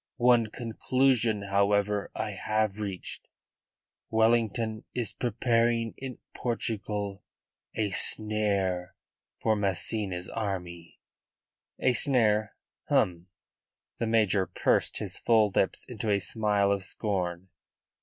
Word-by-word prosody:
One 120 -2 +4
conclusion, 120 -1 +1
however, 100 +1 +1
I - - -2
have 110 -1 -1
reached: 100 -4 -5 0.8
Wellington 110 -1 +1
is 120 -3 -2
preparing 115 -1 +1
in 130 -2 -7 0.2
Portugal 105 -4 -3 0.5
a 105 -3 0
snare 100 -4 0 0.4
for 110 - +1
Massena's 100 -2 -1
army." 90 -6 -5 0.8
"A 130 - +2
snare? 110 -6 +2 0.3
Hum!" 85 0 +1 0.7
The 115 - 0
major 105 -4 +2
pursed - - +1
his - - -3
full 110 -3 +3
lips 95 - +1
into 110 -3 -4
a 100 - +4
smile 100 +1 +1
of 100 -1 0
scorn. 95 -3 -1
105 Hz, 100 wpm, -28 LUFS, 100-115 Hz, 0.8 s, One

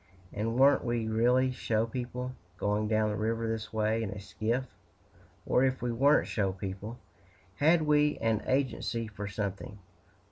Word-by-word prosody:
"And 110 +3 -2
weren't 135 +3 +5
we 120 -2 -1
really 125 +4 +3
show 115 -3 0
people, 125 +2 -5 0.2
going 105 +1 0
down 110 0 +2
the - - -2
river 115 +2 -1
this 110 -1 -3
way, 110 +1 +1
in 110 - -2
a 105 - -6
skiff? 110 +5 -2 0.8
or, 125 - +3
if 130 -1 +1
we 120 - 0
weren't 140 +6 +4
show 100 -3 0
people, 100 +4 -6 0.6
had 160 +3 +4
we 150 -1 +3
an 115 -2 0
agency 130 -3 0
for 105 -1 -6
something? 100 -1 -4
115 Hz, 155 wpm, -30 LUFS, 105-125 Hz, 0.8 s, weren't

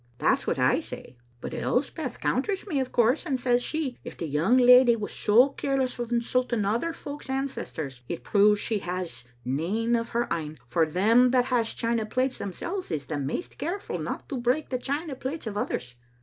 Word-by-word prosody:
That's - - +1
what - - +1
I - - +3
say; - - -9 0.3
but - - -5
Elspeth 265 0 -2
conters 380 +10 0
me, 315 -9 -1
of 260 -1 -2
course, 240 +5 +3
and 275 -7 -1
says 245 0 +2
she, 295 -3 -3
*If - - -8
the - - -3
young 160 - +2
leddy 250 -1 +7
was 215 -2 -5
so 235 +6 +5
careless 270 -2 -1
o* 240 - -1
insulting 235 -1 0
other 230 +11 0
folks* 290 -3 -8
ancestors, 180 - -4
it 170 - -4
proves 210 0 +4
she 220 -1 -1
has 180 -8 -5 0.2
nane 195 - 0
o' 230 - +1
her 235 0 -1
ain; 155 -2 -3
for 155 +7 +1
them 225 +10 +4
that 250 -1 +3
has 230 -2 +1
china 230 -2 0
plates 255 +3 -1
themsel's 345 - -4
is 150 -4 -3
the 150 -2 -3
maist 140 - -4
careful 355 +6 -3
no - - -3
to 275 - -4
break 250 +6 +1
the 255 - -1
china 285 +4 -3
plates 265 +4 -5
of 215 -2 -4
others. 125 -11 -3
240 Hz, 190 wpm, -27 LUFS, 200-265 Hz, 0.3 s, leddy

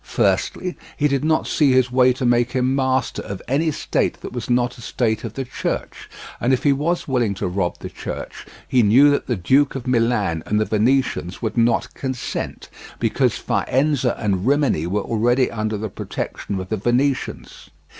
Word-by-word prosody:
Firstly, 180 -1 0 0.2
he 150 - +3
did 140 0 0
not 155 0 +2
see 140 -4 +3
his 130 -1 +3
way 125 0 +5
to 130 +1 -3
make 120 0 +2
him 130 0 +1
master 130 -1 0
of 100 -1 -6
any 145 +6 +1
state 150 - -1
that - - -7
was 120 -1 -5
not 120 0 +1
a - - -10
state 110 -2 -1
of 115 -2 -6
the 135 - -3
Church; 125 - -4 0.3
and 120 - +1
if 130 - +1
he 145 - +4
was 165 +6 -1
willing 120 -7 +1
to 95 - -2
rob 90 -1 -1
the - - -7
Church - - -7 0.2
he 125 - +3
knew 125 +7 +6
that 145 - -1
the 120 - 0
Duke 135 +10 +2
of 135 - -5
Milan 115 -9 +1
and 105 - +1
the 110 - +2
Venetians 110 -4 0
would 110 - -2
not 120 0 +1
consent, 130 -2 -4 0.3
because - - +1
Faenza 135 -2 0
and 100 -1 -1
Rimini 140 - +2
were 100 +3 -1
already 120 +3 +1
under 110 -1 -2
the 110 +2 -3
protection 100 0 -5
of 95 0 -6
the 110 - -1
Venetians. 125 +6 -1
125 Hz, 185 wpm, -21 LUFS, 110-135 Hz, 0.3 s, knew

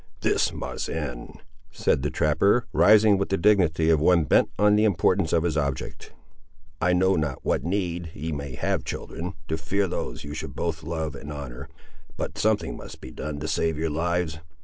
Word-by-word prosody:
"This - - +2
must - - -5
end," 70 -7 -5 0.3
said 80 -4 0
the 75 - -1
trapper, 100 +13 +2
rising 105 -1 +6
with 100 - -1
the 95 - +1
dignity 85 -5 +3
of 80 - +4
one 85 +1 +4
bent 70 - +3
only 105 - +2
on - - +5
the 105 - +3
importance 95 -3 +2
of 85 -1 +2
his 85 -3 0
object. 70 -4 -3 0.7
"I 90 - +3
know 95 +2 +3
not 75 -5 -2
what - - +1
need 85 -1 -2
ye 80 +3 -4
may 70 -3 -5
have, - - -1
children, 90 +4 -5
to 80 0 -2
fear 95 +5 0
those - - -4
you 75 0 -7
should - - -6
both 85 -2 -2
love 80 -3 -3
and 70 +2 -8
honour, 70 -1 -7 0.5
but - - -4
something - - +1
must - - -10
be - - -10
done 75 -1 -5
to 80 - -3
save 80 0 0
your 80 0 -1
lives. 85 0 -1
80 Hz, 195 wpm, -25 LUFS, 75-90 Hz, 0.7 s, rising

